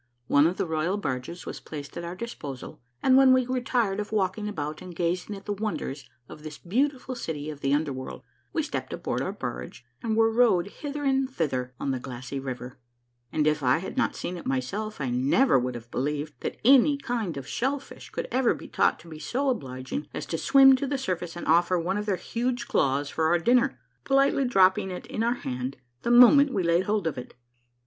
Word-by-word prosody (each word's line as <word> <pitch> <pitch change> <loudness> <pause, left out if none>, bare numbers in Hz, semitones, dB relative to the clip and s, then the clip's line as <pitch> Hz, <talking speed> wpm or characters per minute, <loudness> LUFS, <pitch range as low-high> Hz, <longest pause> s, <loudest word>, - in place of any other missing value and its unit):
One 145 +5 +5
of 180 - -2
the 195 - 0
royal 160 +4 -1
barges 150 -1 -4
was - - -6
placed 145 -2 -8
at 170 - -5
our 170 +1 -5
disposal, 150 - -7 0.2
and 260 - +5
when 265 -1 +7
we 255 -1 +3
grew 255 0 -1
tired 235 -6 0
of 210 0 -4
walking 210 0 0
about 150 -5 -4
and 180 -2 -9
gazing 175 +4 -1
at 195 - -11
the 205 - -1
wonders 155 -11 -4 0.2
of - - -11
this 150 -1 -8
beautiful 260 +7 -1
city 155 - -4
of 150 - -10
the 135 - 0
under 145 0 +1
world, 130 0 -7 0.3
we - - 0
stepped - - -4
aboard - - -2
our - - -2
barge 65 - -6 0.2
and 220 -1 -1
were 225 0 +4
rowed 220 -6 +3
hither 290 +5 -6
and 270 -1 +2
thither 130 - -2
on 140 - -1
the 130 - -2
glassy 130 +2 -6
river; 130 -1 -6 0.5
and 155 -1 +1
if 150 0 +2
I 125 +2 +3
had 185 +3 -6
not 260 - +1
seen 180 - -4
it 170 - -8
myself 195 +12 -2
I 135 -4 -2
never 135 - +3
would 125 0 -3
have 115 0 -9
believed 145 +3 -2
that - - -4
any 275 +3 +6
kind 230 - -3
of 135 - -6
shellfish 270 - -3
could - - -4
ever 255 -1 +2
be - - -10
taught - - +2
to - - -16
be 155 -2 -9
so 270 - -1
obliging 130 - -5
as - - -4
to - - +1
swim 270 -1 +7
to 275 - -2
the 280 +1 -1
surface 180 -9 -3
and 175 - -6
offer 175 +3 +3
one 180 +4 -1
of 210 - -5
their 200 - +2
huge 240 +4 -3
claws 140 0 +1
for 160 - 0
our 170 +2 +4
dinner, 240 +8 +2 0.3
politely 275 0 +3
dropping 190 -4 +4
it 180 - -6
in 220 - -4
our 235 +2 +2
hand 130 - -4 0.2
the - - -2
moment 250 +4 +7
we 200 -7 0
had - - 0
laid 175 +2 +3
hold 210 -3 0
of 155 -6 -2
it. 125 - -10
180 Hz, 220 wpm, -27 LUFS, 145-240 Hz, 0.5 s, when